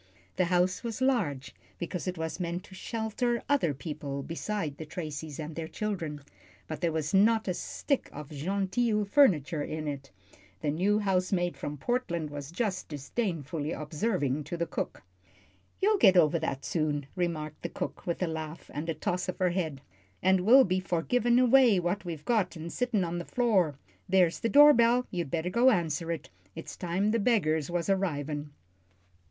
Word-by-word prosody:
The 185 Hz, -, +2 dB
house 180 Hz, +3 st, +1 dB
was 230 Hz, -2 st, -4 dB
large, 205 Hz, -, 0 dB, 0.2 s
because 175 Hz, +1 st, -4 dB
it 180 Hz, -1 st, -2 dB
was 160 Hz, +2 st, -4 dB
meant 175 Hz, 0 st, -3 dB
to -, -, -15 dB
shelter 230 Hz, +4 st, -2 dB
other 280 Hz, -, +2 dB
people 140 Hz, -1 st, -5 dB
beside 165 Hz, -2 st, -3 dB
the 160 Hz, -, -6 dB
Tracys 155 Hz, -2 st, -6 dB
and 155 Hz, 0 st, -5 dB
their 165 Hz, -1 st, -4 dB
children, 165 Hz, -8 st, -4 dB, 0.5 s
but 155 Hz, -2 st, -6 dB
there 170 Hz, -, +1 dB
was 155 Hz, +1 st, -2 dB
not 220 Hz, +3 st, +4 dB
a 185 Hz, -, +1 dB
stick 275 Hz, -, -2 dB
of 150 Hz, 0 st, -9 dB
"genteel" 200 Hz, -, 0 dB
furniture 180 Hz, -, +3 dB
in 155 Hz, +1 st, -4 dB
it, 140 Hz, -1 st, -5 dB, 0.5 s
the 145 Hz, -, 0 dB
new 190 Hz, +7 st, +2 dB
housemaid 185 Hz, -3 st, 0 dB
from 145 Hz, 0 st, -5 dB
Portland 170 Hz, -, -2 dB
was 145 Hz, -1 st, -6 dB
just 190 Hz, 0 st, -2 dB
disdainfully 155 Hz, -, -3 dB
observing 150 Hz, -, -1 dB
to 175 Hz, -, -4 dB
the 170 Hz, -, 0 dB
cook. -, -, -4 dB, 0.8 s
"You'll 415 Hz, +1 st, +3 dB
get 190 Hz, -3 st, +6 dB
over 165 Hz, -1 st, +4 dB
that 135 Hz, -4 st, -3 dB
soon," 150 Hz, -3 st, -1 dB
remarked 155 Hz, -4 st, -3 dB
the 170 Hz, -, -3 dB
cook, -, -, -6 dB
with 170 Hz, +1 st, -1 dB
a -, -, +1 dB
laugh 160 Hz, 0 st, -6 dB
and 150 Hz, +4 st, -4 dB
a 165 Hz, -, -1 dB
toss 180 Hz, +4 st, -2 dB
of 185 Hz, -, -3 dB
her 180 Hz, -1 st, +2 dB
head, 160 Hz, -7 st, -2 dB, 0.4 s
"and 190 Hz, 0 st, +4 dB
will 265 Hz, +4 st, +9 dB
be 185 Hz, -3 st, +1 dB
for 175 Hz, -3 st, -1 dB
givin' 240 Hz, +2 st, +2 dB
away 250 Hz, -4 st, +6 dB
what 175 Hz, +3 st, -2 dB
we've 160 Hz, -4 st, -6 dB
got 210 Hz, -8 st, +1 dB
an' 165 Hz, +1 st, -6 dB
sittin' 245 Hz, -6 st, 0 dB
on 175 Hz, 0 st, -2 dB
the -, -, -4 dB
floor. 195 Hz, -, +2 dB, 0.3 s
There's 180 Hz, -3 st, +3 dB
the 230 Hz, -, 0 dB
door 295 Hz, +2 st, +9 dB
bell. 240 Hz, +1 st, +4 dB
You'd 175 Hz, -5 st, -3 dB
better 170 Hz, +4 st, -1 dB
go 240 Hz, +6 st, +5 dB
answer 165 Hz, -, 0 dB
it; 165 Hz, -, -5 dB, 0.2 s
it's 165 Hz, -, -7 dB
time 185 Hz, +4 st, 0 dB
the 230 Hz, -, +1 dB
beggars 160 Hz, -, +2 dB
was 175 Hz, -1 st, -1 dB
arrivin'." 155 Hz, -7 st, -1 dB
Mr. -, -, -15 dB
175 Hz, 180 wpm, -29 LUFS, 155-210 Hz, 0.8 s, will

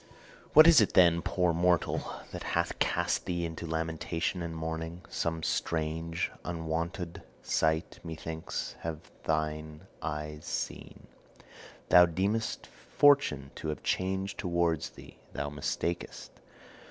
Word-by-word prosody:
'What 155 Hz, +1 st, +10 dB
is 165 Hz, -7 st, +8 dB
it, 105 Hz, -, +2 dB
then, 85 Hz, -2 st, +6 dB
poor 90 Hz, -1 st, +1 dB
mortal, 85 Hz, +1 st, +1 dB, 0.2 s
that -, -, -6 dB, 0.2 s
hath -, -, -1 dB
cast -, -, +1 dB
thee 85 Hz, -1 st, -1 dB
into 85 Hz, 0 st, -5 dB
lamentation 80 Hz, +2 st, -2 dB
and 85 Hz, -1 st, -4 dB
mourning? 80 Hz, +2 st, -4 dB
Some 80 Hz, -1 st, -2 dB
strange, 80 Hz, +1 st, -1 dB
unwonted 85 Hz, +1 st, -3 dB, 0.2 s
sight, 80 Hz, +1 st, 0 dB
methinks, 80 Hz, -1 st, -5 dB
have 80 Hz, -1 st, -6 dB
thine 80 Hz, +1 st, -2 dB, 0.2 s
eyes 75 Hz, -1 st, -4 dB
seen. -, -, -5 dB, 0.8 s
Thou 90 Hz, +1 st, +8 dB
deemest 100 Hz, +6 st, -1 dB
Fortune 135 Hz, -, +3 dB
to -, -, -6 dB
have 75 Hz, -, -4 dB
changed 95 Hz, +1 st, -1 dB
towards 85 Hz, -3 st, 0 dB
thee; -, -, -14 dB
thou 75 Hz, -, -3 dB
mistakest. 85 Hz, +4 st, -3 dB
80 Hz, 115 wpm, -30 LUFS, 80-90 Hz, 0.8 s, What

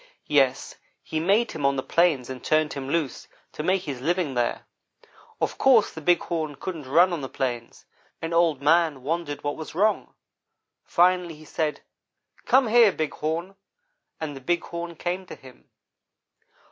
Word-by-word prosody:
Yes, 135 Hz, -3 st, +1 dB, 0.3 s
he 155 Hz, -, -3 dB
made 200 Hz, +8 st, +2 dB
him 155 Hz, -, -6 dB
on 140 Hz, 0 st, +3 dB
the 130 Hz, -, -2 dB
plains 165 Hz, -7 st, +2 dB
and 130 Hz, -1 st, -8 dB
turned 155 Hz, -1 st, +1 dB
him 135 Hz, -1 st, -6 dB
loose, 155 Hz, -3 st, -2 dB, 0.2 s
to -, -, -6 dB
make 185 Hz, +3 st, +1 dB
his 140 Hz, -6 st, -5 dB
living 170 Hz, -1 st, 0 dB
there. 120 Hz, -1 st, -1 dB, 0.7 s
Of -, -, -2 dB
course 255 Hz, -5 st, +5 dB
the 160 Hz, -, -8 dB
Big 175 Hz, +2 st, +3 dB
Horn 160 Hz, -4 st, -3 dB
couldn't 155 Hz, -2 st, -6 dB
run 175 Hz, +5 st, +5 dB
on 165 Hz, -, -3 dB
the 135 Hz, -, -5 dB
plains, 120 Hz, -3 st, -4 dB, 0.3 s
and 165 Hz, 0 st, -4 dB
Old 165 Hz, -5 st, +2 dB
man 155 Hz, -3 st, +3 dB
wondered 155 Hz, 0 st, -3 dB
what 145 Hz, 0 st, -2 dB
was 160 Hz, 0 st, -8 dB
wrong. 210 Hz, +4 st, +1 dB, 0.7 s
Finally, 180 Hz, -1 st, +2 dB
he 155 Hz, +1 st, -15 dB
said: 155 Hz, -1 st, -2 dB, 0.7 s
'Come 255 Hz, -2 st, +4 dB
here, 230 Hz, -2 st, +6 dB
Big 155 Hz, -4 st, -3 dB
Horn!' 165 Hz, +5 st, -3 dB, 0.6 s
and 155 Hz, -3 st, -4 dB
the 135 Hz, -, -9 dB
Big 175 Hz, +6 st, 0 dB
Horn 170 Hz, 0 st, -6 dB
came 180 Hz, +3 st, -4 dB
to -, -, -8 dB
him. 130 Hz, -1 st, -17 dB
160 Hz, 170 wpm, -25 LUFS, 140-175 Hz, 0.7 s, here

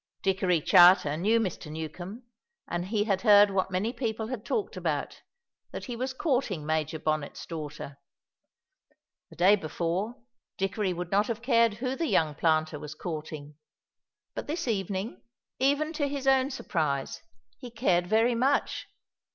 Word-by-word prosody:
Dickory 185 Hz, -3 st, +2 dB
Charter 175 Hz, -3 st, +6 dB
knew 210 Hz, +8 st, +2 dB
Mr. 185 Hz, -7 st, -4 dB
Newcombe, 175 Hz, -, -7 dB, 0.4 s
and 175 Hz, +1 st, -3 dB
he 210 Hz, 0 st, +1 dB
had 195 Hz, -3 st, 0 dB
heard 205 Hz, -2 st, +7 dB
what 190 Hz, -1 st, 0 dB
many 195 Hz, +6 st, -1 dB
people 220 Hz, -3 st, -3 dB
had 250 Hz, -5 st, -5 dB
talked 425 Hz, -, -2 dB
about, -, -, -3 dB, 0.5 s
that -, -, -7 dB
he 245 Hz, -, -5 dB
was 255 Hz, +3 st, -2 dB
courting 255 Hz, -, -1 dB
Major 155 Hz, 0 st, -1 dB
Bonnet's 155 Hz, -2 st, -3 dB
daughter. 150 Hz, -3 st, -7 dB, 1.3 s
The -, -, -15 dB
day 185 Hz, +4 st, +5 dB
before 180 Hz, +5 st, -3 dB, 0.4 s
Dickory 195 Hz, 0 st, -1 dB
would 175 Hz, 0 st, -5 dB
not 205 Hz, +2 st, +3 dB
have 230 Hz, 0 st, -4 dB
cared 230 Hz, -4 st, +3 dB
who 255 Hz, +3 st, -3 dB
the 330 Hz, +3 st, -1 dB
young 155 Hz, -, +2 dB
planter 155 Hz, 0 st, +1 dB
was 150 Hz, 0 st, -8 dB
courting, 155 Hz, -3 st, -6 dB, 0.8 s
but -, -, -6 dB
this 320 Hz, 0 st, -3 dB
evening, 195 Hz, 0 st, -2 dB, 0.4 s
even 285 Hz, +4 st, +1 dB
to 290 Hz, -2 st, 0 dB
his 275 Hz, -1 st, -4 dB
own 265 Hz, 0 st, +4 dB
surprise, 155 Hz, -, -2 dB, 0.4 s
he 245 Hz, -, -8 dB
cared 185 Hz, -7 st, +1 dB
very 225 Hz, +4 st, +3 dB
much. 265 Hz, +4 st, 0 dB
195 Hz, 150 wpm, -28 LUFS, 160-235 Hz, 1.3 s, heard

